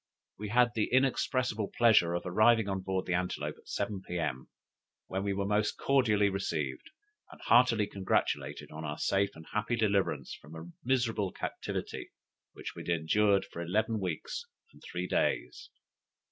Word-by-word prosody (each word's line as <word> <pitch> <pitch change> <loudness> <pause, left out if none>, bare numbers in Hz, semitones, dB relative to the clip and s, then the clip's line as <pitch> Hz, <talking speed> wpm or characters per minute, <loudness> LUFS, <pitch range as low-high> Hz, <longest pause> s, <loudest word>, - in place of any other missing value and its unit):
We 105 0 -4
had 120 +2 +4
the 110 -1 0
inexpressible 130 -4 +1
pleasure 110 -8 +5
of 85 - -2
arriving 110 +4 +4
on 95 -1 -1
board 95 0 -2
the 90 - -1
Antelope 90 +1 -2
at - - -23
seven, 100 -1 -2
P.M., 80 -8 -3 0.6
where 95 +1 -3
we 100 0 -1
were 100 0 -1
most 105 +1 +1
cordially 110 -7 +3
received, 85 -8 -2 0.4
and - - -14
heartily 115 -2 +5
congratulated 95 -2 -1
on 80 +1 -7
our 75 0 -4
safe 100 +3 +2
and 80 0 -11
happy 105 +3 0
deliverance 100 -4 0
from 75 +3 -12
a 80 +2 -9
miserable 120 -6 +1
captivity, - - -5 0.4
which - - -7
we - - -7
had - - -7
endured 100 +4 +3
for 85 - -8
eleven 110 +6 0
weeks 90 - -3 0.3
and - - -18
three - - -4
days. - - -1
100 Hz, 160 wpm, -31 LUFS, 90-110 Hz, 0.6 s, pleasure